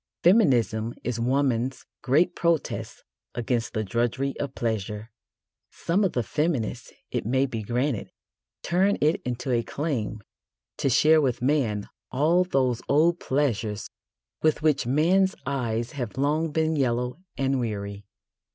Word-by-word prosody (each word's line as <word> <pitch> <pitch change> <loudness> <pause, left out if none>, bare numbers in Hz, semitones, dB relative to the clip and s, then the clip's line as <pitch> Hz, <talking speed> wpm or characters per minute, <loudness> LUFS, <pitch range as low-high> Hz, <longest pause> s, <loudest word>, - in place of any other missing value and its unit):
Feminism 120 - +3
is 120 -1 -2
woman's 130 0 0 0.2
great 150 +6 +3
protest 170 -2 -1 0.3
against 120 0 -1
the 110 - -1
drudgery 120 +6 -1
of 140 -2 -4
pleasure. 110 -1 -3 0.6
Some 185 +5 0
of 190 - +1
the 120 - 0
feminists, 130 -4 -2 0.2
it - - -1
may 130 +5 +2
be 115 -4 -4
granted, 120 +3 -1 0.5
turn 190 +4 +2
it 155 +2 +2
into 125 +2 -3
a 120 -1 +2
claim 115 -7 -3 0.5
to 135 - +1
share 155 +5 +5
with 125 -4 0
man 125 -8 +1 0.2
all 160 +7 +3
those 130 -9 0
old 165 +4 +4
pleasures 115 -7 -1 0.5
with 155 -1 +2
which 150 -6 +2
man's 180 +8 +3
eyes 120 -4 -2
have 125 -6 -5
long 150 +3 +1
been 160 +1 +1
yellow 125 0 0 0.2
and 135 0 +1
weary. 100 -3 -4
130 Hz, 135 wpm, -26 LUFS, 115-155 Hz, 0.6 s, share